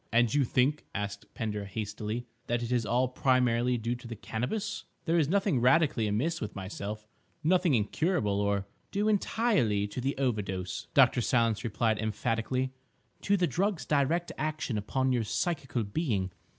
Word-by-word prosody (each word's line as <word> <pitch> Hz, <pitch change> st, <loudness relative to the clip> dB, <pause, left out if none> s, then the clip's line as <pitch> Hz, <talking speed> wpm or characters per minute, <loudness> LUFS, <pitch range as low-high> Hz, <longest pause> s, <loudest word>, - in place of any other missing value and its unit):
"And 120 Hz, -1 st, +3 dB
you 145 Hz, -, +4 dB
think," 135 Hz, +5 st, +1 dB
asked 105 Hz, 0 st, -4 dB
Pender 105 Hz, -3 st, -3 dB
hastily, 105 Hz, +3 st, -4 dB, 0.2 s
"that 120 Hz, 0 st, 0 dB
it 120 Hz, -, -4 dB
is 120 Hz, -4 st, +1 dB
all 125 Hz, +2 st, +2 dB
primarily 125 Hz, -1 st, +2 dB
due 115 Hz, +1 st, -1 dB
to 120 Hz, -, -11 dB
the 115 Hz, -, -6 dB
Cannabis? 165 Hz, -, -3 dB, 0.2 s
There 170 Hz, 0 st, +3 dB
is 150 Hz, -3 st, +2 dB
nothing 190 Hz, -8 st, +2 dB
radically 130 Hz, -4 st, +4 dB
amiss 130 Hz, +12 st, 0 dB
with 105 Hz, -, -4 dB
myself—nothing 110 Hz, -, -1 dB
incurable, 105 Hz, -, +1 dB
or—?" 100 Hz, -1 st, 0 dB, 0.2 s
"Due 205 Hz, +2 st, 0 dB
entirely 205 Hz, -, +2 dB
to 125 Hz, -, -4 dB
the 135 Hz, +2 st, -1 dB
overdose," 100 Hz, -9 st, -2 dB
Dr. -, -, +6 dB
Silence 115 Hz, -2 st, +2 dB
replied 110 Hz, 0 st, 0 dB
emphatically, 115 Hz, +4 st, -1 dB, 0.5 s
"to 200 Hz, 0 st, +2 dB
the 180 Hz, -, +3 dB
drug's 190 Hz, +1 st, 0 dB
direct 155 Hz, +4 st, +1 dB
action 155 Hz, -5 st, -2 dB
upon 130 Hz, +6 st, 0 dB
your 120 Hz, -2 st, +1 dB
psychical 135 Hz, -, -1 dB
being. 100 Hz, -, -1 dB
120 Hz, 150 wpm, -30 LUFS, 105-150 Hz, 0.5 s, Dr